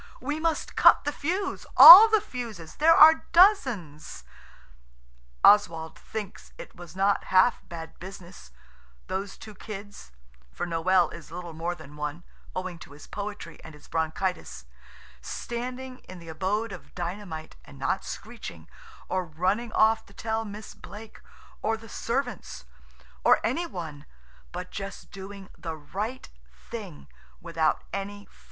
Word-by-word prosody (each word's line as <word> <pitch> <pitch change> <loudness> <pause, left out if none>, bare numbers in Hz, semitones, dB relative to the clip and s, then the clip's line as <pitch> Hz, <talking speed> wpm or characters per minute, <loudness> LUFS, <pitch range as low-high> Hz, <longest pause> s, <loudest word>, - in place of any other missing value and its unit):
We 290 +4 -3
must 325 -1 -2
cut - - +6
the 290 - -1
fuse–all 370 +5 +8
the 435 -1 +3
fuses; 230 - -8
there 325 +2 +6
are 320 +1 +7
dozens." 260 - +2 1.2
Oswald 165 -6 +4
thinks 185 - -8
it - - -11
was 175 -1 -12
not 195 +1 +1
half 190 +6 +3
bad 165 -2 -9
business, 180 - -11 0.6
those 195 +1 -5
two 215 - -11
kids–for 60 - -10
Noël 175 +2 +2
is 170 - -11
little 175 -1 -7
more 170 +2 -3
than 150 -3 -13
one, 150 +3 -5 0.3
owing 185 -2 -5
to 150 - -13
his 145 - -13
poetry 205 -4 -7
and 160 -2 -11
his 150 - -17
bronchitis–standing 180 - -5
in 185 - -9
the 170 -1 -12
abode 200 +7 -2
of 180 - -11
dynamite 175 -2 -6
and 140 - -15
not 135 +8 -1
screeching, 225 +3 -9 0.4
or 185 0 -1
running 185 +8 -2
off 220 +1 +3
to 200 - -19
tell 220 +1 -2
Miss 210 0 -9
Blake, 210 +2 -12 0.4
or 225 0 0
the 225 +1 -14
servants, 245 +4 -4 0.6
or - - +5
any 345 +1 -1
one–but 175 - -10
just 195 0 -8
doing 195 0 -10
the 165 -2 -6
right 200 - -6 0.2
thing 65 +3 -10 0.3
without 165 -2 -1
any 205 +1 -5
fuss. - - -26
190 Hz, 135 wpm, -27 LUFS, 160-225 Hz, 1.2 s, fuse–all